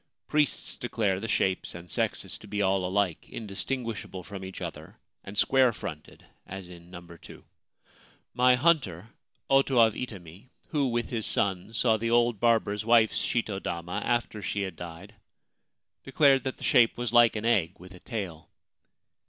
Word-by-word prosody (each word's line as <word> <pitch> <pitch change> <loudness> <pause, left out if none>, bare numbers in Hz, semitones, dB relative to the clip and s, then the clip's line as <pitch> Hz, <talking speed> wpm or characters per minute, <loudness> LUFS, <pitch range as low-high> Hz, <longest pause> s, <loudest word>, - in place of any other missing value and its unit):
Priests 150 -2 0
declare 105 -6 -1
the 110 - -5
shapes 95 -5 0
and 85 0 -9
sexes - - -2
to - - -13
be 105 0 -4
all 95 -1 +1
alike, 95 -2 -1
indistinguishable 110 -2 -4
from 100 0 -8
each 95 0 -8
other - - -8 0.3
and 100 +1 -10
square 130 +2 +4
fronted, 75 -7 -9 0.2
as 95 -1 -8
in 85 -1 -13
No. 90 -1 -9
2. 85 -1 -13 0.9
My 125 0 +5
hunter, 125 - +1 0.4
Oto 135 -1 +3
of 115 -2 +6
Itami, 100 -3 -8 0.2
who, 145 -3 +1
with 120 -1 -2
his 115 -3 -1
son, 100 +1 0
saw 110 0 +3
the 115 +2 -2
old 120 -2 +2
barber's 110 -3 +2
wife's 115 -1 +3
shito 105 -5 -1
dama 85 0 -4
after 120 -3 -1
she 100 +1 -2
had 95 -3 -5
died, 85 +5 -9 0.9
declared 135 -1 +4
that 130 - -3
the - - -11
shape 115 -2 +4
was 120 -1 -3
like 120 -2 +6
an 110 +1 -3
egg 95 -7 +2
with 90 +2 -13
a 90 - -13
tail. 90 -9 -6
105 Hz, 160 wpm, -28 LUFS, 95-120 Hz, 0.9 s, of